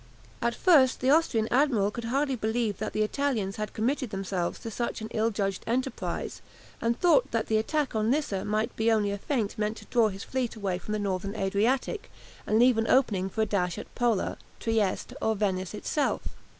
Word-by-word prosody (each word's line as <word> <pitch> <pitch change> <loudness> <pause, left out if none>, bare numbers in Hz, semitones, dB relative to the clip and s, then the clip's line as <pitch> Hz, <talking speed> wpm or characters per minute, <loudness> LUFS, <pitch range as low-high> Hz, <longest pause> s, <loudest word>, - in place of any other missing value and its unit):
At 235 0 0
first 280 -8 +5
the 260 +1 +3
Austrian 285 -9 +3
admiral 245 -7 +3
could 235 +1 -6
hardly 270 +3 0
believe 220 -2 -1
that 215 - -3
the 215 - +2
Italians 215 -5 -1
had 215 0 -3
committed 255 +3 0
themselves 190 -3 -2
to 225 - -6
such 235 +2 -3
an 220 0 -6
ill 220 +1 +1
judged 195 -3 -2
enterprise, 255 +2 -2 0.4
and 230 +1 0
thought 285 -7 +4
that 230 -1 0
the 220 - +1
attack 290 +5 0
on 215 0 +1
Lissa 255 -8 0
might 215 +2 -1
be 225 +1 +2
only 210 -2 +2
a 200 - -3
feint 225 -4 -2
meant 215 +1 -1
to - - -11
draw 235 -3 +3
his 195 -2 -6
fleet 255 -3 -2
away 195 -4 -2
from 210 - -5
the - - +1
Northern 200 0 -2
Adriatic, 220 - 0 0.4
and 215 - +3
leave 240 0 +5
an 225 - 0
opening 200 -8 +3
for 220 - -2
a - - +3
dash 180 -5 -1
at - - -8
Pola, 235 -5 0 0.2
Trieste, 220 -4 0
or 220 0 +1
Venice 190 -2 -1
itself. 290 +6 -1
220 Hz, 200 wpm, -28 LUFS, 205-250 Hz, 0.4 s, first